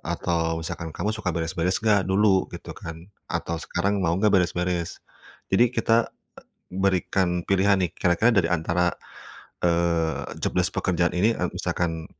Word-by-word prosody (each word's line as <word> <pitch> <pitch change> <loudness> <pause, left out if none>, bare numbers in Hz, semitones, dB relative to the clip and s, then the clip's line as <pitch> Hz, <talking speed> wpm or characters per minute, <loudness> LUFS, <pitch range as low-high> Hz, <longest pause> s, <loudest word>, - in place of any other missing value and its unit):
Atau 85 -1 -1
misalkan, 80 0 -6
"kamu 105 - -1
suka 110 -4 -4
beres-beres 85 +2 -1
enggak 105 -4 +3
dulu?" 95 -1 +3
Gitu - - -8
kan 85 +3 -10 0.2
atau, 85 - -2
"sekarang 100 +3 -1
mau 85 -2 +1
enggak 105 +1 +2
beres-beres?" 90 -2 0 0.5
Jadi 120 +6 +5
kita, 115 0 +2 0.6
e - - -9
berikan 95 -2 +1
pilihan 95 +1 +3
nih 90 - 0
kira-kira 90 +6 +2
dari 95 -6 +3
antara, 85 +1 +1 0.7
eee, 85 -2 0
jobdesc - - 0
pekerjaan 85 -1 0
ini 105 +6 +3
e - - -5
misalkan, 80 -2 -2
90 Hz, 145 wpm, -25 LUFS, 85-95 Hz, 0.7 s, Jadi